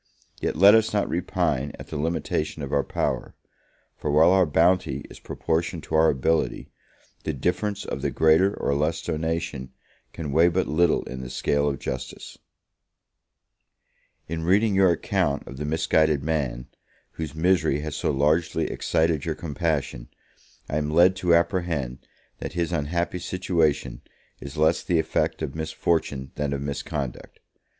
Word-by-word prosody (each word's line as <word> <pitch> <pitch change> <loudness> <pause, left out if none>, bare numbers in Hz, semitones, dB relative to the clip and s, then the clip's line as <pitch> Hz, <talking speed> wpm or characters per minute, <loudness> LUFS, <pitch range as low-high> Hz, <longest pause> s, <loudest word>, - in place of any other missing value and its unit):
yet - - -1
let 100 +6 +8
us 110 -1 +3
not 100 - +1
repine 85 -6 -1
at - - -11
the - - -6
limitation 80 -1 -2
of 70 - -5
our 70 -1 +3
power; - - -2 0.6
for 75 - -4
while 80 +4 +5
our 95 -2 +4
bounty 80 -3 +2
is - - -11
proportioned 80 0 -2
to - - -9
our 80 0 +5
ability, 80 +4 0 0.5
the 80 - -2
difference 90 +8 -2
of - - -4
the - - 0
greater 80 +5 +3
or 70 - 0
less 75 +3 0
donation 80 -4 -3 0.4
can 75 -4 -5
weigh 80 +4 +5
but 90 +2 +1
little 85 +2 +2
in 65 0 -7
the 65 - -7
scale 70 +2 +1
of 70 - -3
justice. 65 0 -6 1.9
In 80 +1 -4
reading 100 +6 +3
your 95 -1 +5
account 75 -4 0
of 65 - -9
the 75 - -4
misguided 80 -1 +2
man, 70 -6 -2 0.5
whose 80 -2 -6
misery 80 -4 +2
has 75 -1 -5
so - - -1
largely 75 +4 +1
excited 80 -3 0
your 80 -2 -2
compassion, 75 -6 -2 0.6
I 75 - -2
am 75 -1 -1
led 85 +4 +5
to 90 -2 +3
apprehend 85 -8 0 0.4
that - - -6
his 85 0 -1
unhappy 85 +3 -1
situation 80 -9 0 0.4
is 70 +1 -9
less 80 +1 +3
the 85 - +1
effect 80 0 0
of 65 - -3
misfortune 80 -4 -1
than 75 -1 -2
of 70 - -3
misconduct. 70 -1 -5
80 Hz, 155 wpm, -25 LUFS, 70-85 Hz, 1.9 s, let